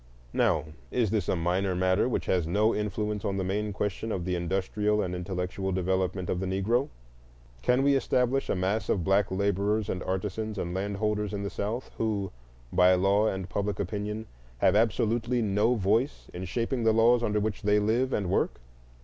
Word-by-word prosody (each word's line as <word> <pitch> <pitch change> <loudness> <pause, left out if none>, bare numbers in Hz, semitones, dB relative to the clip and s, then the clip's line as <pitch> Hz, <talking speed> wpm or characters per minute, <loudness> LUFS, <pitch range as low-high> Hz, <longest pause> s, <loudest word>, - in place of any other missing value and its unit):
Now, - - +2 0.2
is 115 -5 0
this 105 -5 0
a - - +2
minor 90 +3 0
matter 95 +5 +2
which - - -1
has 90 -4 +1
no 105 +6 +2
influence 105 0 -2
on 100 -1 -1
the 95 - -1
main 105 +3 -1
question 105 +2 -3
of 90 -4 -2
the 90 - -1
industrial 95 +4 0
and 90 -3 -1
intellectual 90 +1 -3
development 95 0 -1
of 90 - -1
the 95 - -2
Negro? 110 +9 +1 0.7
Can 125 - +2
we 140 0 +4
establish 130 0 +1
a - - +1
mass 95 +4 -1
of 90 - +1
black 95 +2 +2
laborers 100 +2 0
and 90 - -2
artisans 105 +3 -3
and 85 -2 -3
landholders 105 +2 -1
in 100 - -3
the 100 - -3
South 110 +5 -4
who, 105 -4 -1 0.4
by 90 0 +6
law 100 +4 +3
and 95 -3 -2
public 100 -1 -2
opinion, 105 +1 -3 0.3
have 95 +10 +3
absolutely 115 +2 +1
no 105 +4 +2
voice 110 +7 0
in 90 +1 -5
shaping 120 +5 -1
the 110 -1 +4
laws 115 +2 +5
under 105 -2 +1
which 105 0 -2
they 105 0 +3
live 115 +5 +1
and 100 -7 0
work? - - 0
100 Hz, 185 wpm, -28 LUFS, 95-110 Hz, 0.7 s, by